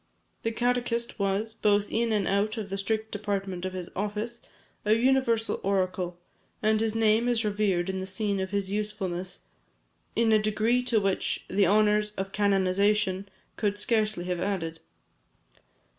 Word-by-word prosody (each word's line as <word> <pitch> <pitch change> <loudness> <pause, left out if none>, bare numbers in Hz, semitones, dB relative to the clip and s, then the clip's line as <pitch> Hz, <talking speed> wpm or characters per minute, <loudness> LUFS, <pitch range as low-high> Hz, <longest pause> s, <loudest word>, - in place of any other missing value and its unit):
The 225 - -1
catechist 240 0 -1
was, 200 +3 0
both 210 -2 +1
in 230 0 +1
and 210 -3 +1
out 210 +3 +1
of 205 -3 -5
the 195 - -1
strict 220 +2 -2
department 195 -3 -3
of 185 - -3
his 180 -2 -5
office, 210 +4 -3 0.4
a 215 - +4
universal 235 -2 +2
oracle, 185 -2 -1 0.5
and 215 0 +3
his 225 -1 0
name 225 +1 +3
is 235 -2 +2
revered 200 -4 +1
in 190 0 -2
the 190 - -4
scene 200 +1 -1
of 190 0 -2
his 200 -1 -2
usefulness 195 -3 -3 0.7
in 230 -1 +3
a 215 - +6
degree 215 +3 +2
to 235 -3 +3
which 195 -2 -1
the 195 0 +3
honours 210 +1 +3
of 195 0 -3
canonization 200 0 +2 0.3
could 205 -2 0
scarcely 215 -3 +1
have 180 -1 -2
added. 165 -4 -2
210 Hz, 155 wpm, -28 LUFS, 195-220 Hz, 0.7 s, a